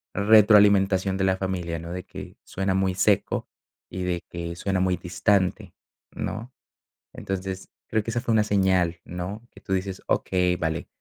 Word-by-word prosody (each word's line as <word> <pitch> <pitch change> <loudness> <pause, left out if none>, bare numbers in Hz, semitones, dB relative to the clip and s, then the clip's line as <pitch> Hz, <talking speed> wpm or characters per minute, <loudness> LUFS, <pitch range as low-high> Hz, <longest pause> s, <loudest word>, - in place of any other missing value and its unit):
retroalimentación 100 -2 +5
de 95 - 0
la 95 0 +2
familia, 90 -3 -3
¿no? 85 +1 -8
De 90 +1 -5
que, - - -10
suena 95 0 -2
muy 95 -1 +1
seco 95 +2 +1 0.4
y 95 - -5
de 90 -1 -1
que 85 0 -6
suena 95 +2 -1
muy 90 -1 +1
distante, 90 +2 0 0.4
¿no? 115 +4 -5 0.6
Entonces, 95 0 -5 0.2
creo 110 - 0
que 115 - -5
esa 120 +1 -1
fue 120 - -2
una 105 -1 +3
señal, 95 -4 +2
¿no? 90 +5 -6
Que - - -16
tú 95 - -4
dices: 95 0 -2
"Okey, 90 -1 +1
vale, 80 -1 -3
95 Hz, 165 wpm, -25 LUFS, 90-100 Hz, 0.6 s, retroalimentación